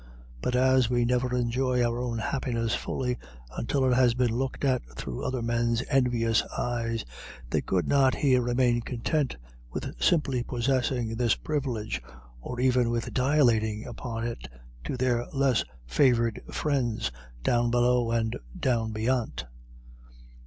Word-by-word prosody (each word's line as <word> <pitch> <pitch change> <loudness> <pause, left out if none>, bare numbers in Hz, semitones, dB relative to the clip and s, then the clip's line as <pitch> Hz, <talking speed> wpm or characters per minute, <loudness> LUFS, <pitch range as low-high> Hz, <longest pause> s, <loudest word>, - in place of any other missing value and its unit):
But 125 - 0
as 130 -1 +4
we 120 -1 +2
never 125 +1 +1
enjoy 125 +1 +1
our 120 0 -1
own 120 -2 -2
happiness 115 -1 -1
fully 125 -2 -2 0.4
until 130 +3 0
it 130 - +3
has 125 -2 +4
been 125 -2 +2
looked 130 +3 -2
at 130 -2 +2 0.2
through 60 -3 -5
other 130 -2 -2
men's 115 0 +1
envious 120 -4 +3 0.2
eyes, 115 -2 -2 0.5
they - - +2
could 90 -2 0
not 135 -2 +4
here 130 -3 +3
remain 120 0 +2
content 130 +5 -1 0.3
with - - -5
simply 140 -7 +2
possessing 120 -2 -1
this 120 -2 +3
privilege, 130 -8 -3 0.4
or 120 - -6
even 125 -2 +3
with 115 -1 -2
dilating 120 -6 +2
upon 115 -1 -5
it 115 - -5 0.4
to - - -3
their 120 -1 +1
less 135 -3 +2 0.2
favoured 115 - +2
friends 130 - -1 0.3
down 120 0 +2
below 120 0 +3
and 115 -1 0 0.2
down 115 -3 0
beyant. 115 - -1
120 Hz, 140 wpm, -27 LUFS, 115-130 Hz, 0.5 s, as